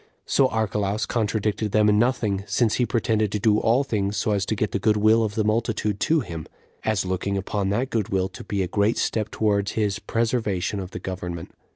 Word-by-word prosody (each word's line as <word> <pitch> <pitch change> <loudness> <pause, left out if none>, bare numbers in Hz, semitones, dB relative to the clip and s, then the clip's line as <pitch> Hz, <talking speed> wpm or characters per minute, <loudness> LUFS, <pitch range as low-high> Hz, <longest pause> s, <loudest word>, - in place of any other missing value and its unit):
So 135 - +3
Archelaus 105 -2 -1
contradicted 105 -2 -1
them 105 0 +4
in 105 0 +4
nothing, 110 -5 +1
since 105 +2 +1
he 125 - +1
pretended 110 -3 +1
to 105 - 0
do 105 0 +3
all 120 +5 +3
things 105 -5 -1
so 110 - 0
as 100 -1 0
to 110 - 0
get 105 -2 -1
the 100 - -1
good 105 +1 +2
will 110 +2 +4
of 105 -1 -2
the 110 - +1
multitude 110 -1 0
to 160 -1 +2
him, 80 -8 -7 0.4
as 110 -3 0
looking 95 +2 -1
upon 95 +1 -2
that 120 +6 -1
good 110 -4 -1
will 95 -1 +1
to 95 - -10
be 100 -2 -1
a - - -2
great 105 +4 +1
step 110 -1 -1
towards 105 -2 0
his 105 -3 0
preservation 110 -4 -1
of 95 -2 -5
the - - -7
government. 90 -3 -6
105 Hz, 215 wpm, -24 LUFS, 100-110 Hz, 0.4 s, them